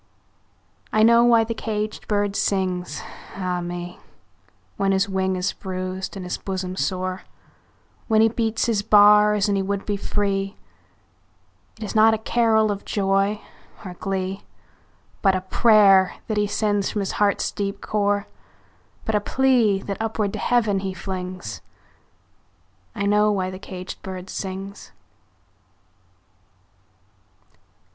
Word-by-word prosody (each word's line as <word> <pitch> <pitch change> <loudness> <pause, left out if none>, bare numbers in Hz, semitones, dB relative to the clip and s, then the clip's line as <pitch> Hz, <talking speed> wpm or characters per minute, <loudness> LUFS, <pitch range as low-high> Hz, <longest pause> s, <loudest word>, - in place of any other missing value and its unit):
I 215 - +3
know 235 +1 +6
why 235 -1 +5
the 230 +1 -3
caged 215 -1 -4
bird 205 -1 0
sings, 185 -2 -1 0.3
ah 180 -2 -2
me, 175 0 -6 0.8
When 195 0 +1
his 190 +1 +2
wing 190 -1 -1
is 180 +2 -1
bruised 185 0 -5
and 185 - -6
his 180 - -4
bosom 185 -1 -4
sore, 185 +4 -2 0.9
When 220 -2 +3
he 220 - +6
beats 225 -1 -1
his 225 -4 +1
bars 210 0 +5
and 200 - +1
he 195 - +1
would 200 +1 -3
be 205 -1 -1
free; 195 -1 -2 1.2
It 220 - -8
is 210 - -5
not 220 0 +5
a - - -3
carol 220 -1 +2
of 200 -1 -5
joy 195 +1 0 0.4
or 180 - -6
glee, 190 +1 -3 0.8
But 195 -2 +3
a 185 - -1
prayer 195 -2 +5
that 215 - -2
he 210 0 +2
sends 205 -1 0
from 210 - -2
his 195 - -2
heart's 200 -1 +2
deep 200 0 -3
core, 205 -1 0 0.8
But 220 - -1
a 210 - +2
plea, 235 -5 +2
that 200 +1 -5
upward 220 -2 -1
to - - -4
Heaven 215 -5 +1
he 190 -1 -4
flings 185 -1 -6 1.3
I 200 -2 -2
know 210 +1 +3
why 185 -2 -1
the 185 - -8
caged 185 -1 -8
bird 185 0 -7
sings! 195 +1 -6
200 Hz, 135 wpm, -23 LUFS, 190-215 Hz, 1.3 s, know